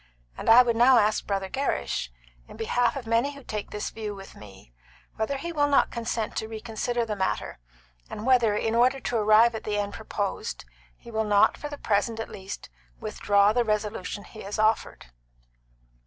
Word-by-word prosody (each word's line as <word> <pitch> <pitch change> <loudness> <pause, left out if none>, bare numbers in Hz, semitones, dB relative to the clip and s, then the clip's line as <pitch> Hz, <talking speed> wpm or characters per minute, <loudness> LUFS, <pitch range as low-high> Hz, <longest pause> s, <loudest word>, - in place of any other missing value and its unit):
And - - -3
I 240 +3 +9
would 235 -2 0
now 245 +2 +6
ask 215 -1 +2
Brother 195 -1 -1
Gerrish, 190 - -2 0.4
in - - -12
behalf 235 +2 +1
of 270 -4 -5
many 230 +6 +1
who 280 - -12
take 210 -3 -5
this 210 0 -4
view 215 -2 -5
with 195 0 -11
me, 95 -11 -14 0.4
whether 220 +6 -2
he 340 +5 -5
will 290 -2 +2
not 285 - +3
consent 230 -2 -3
to 220 - -2
reconsider 225 +2 -3
the 215 -2 -3
matter, 190 - -2 0.5
and 210 - -6
whether, 240 -5 +4
in 220 +1 -1
order 250 +3 +3
to 245 - -2
arrive 215 +2 +5
at 220 - -5
the 210 -1 -2
end 205 0 -2
proposed, 220 - -4 0.3
he 235 - -13
will 220 0 0
not, 205 -1 +4
for 295 - -7
the 290 - -7
present 220 -1 0
at 225 - -4
least, 195 -1 -8 0.3
withdraw 200 - +2
the 240 +1 +2
resolution 210 -2 -2
he 220 - -12
has 200 +1 -5
offered?" 215 - 0
220 Hz, 185 wpm, -26 LUFS, 205-240 Hz, 0.5 s, I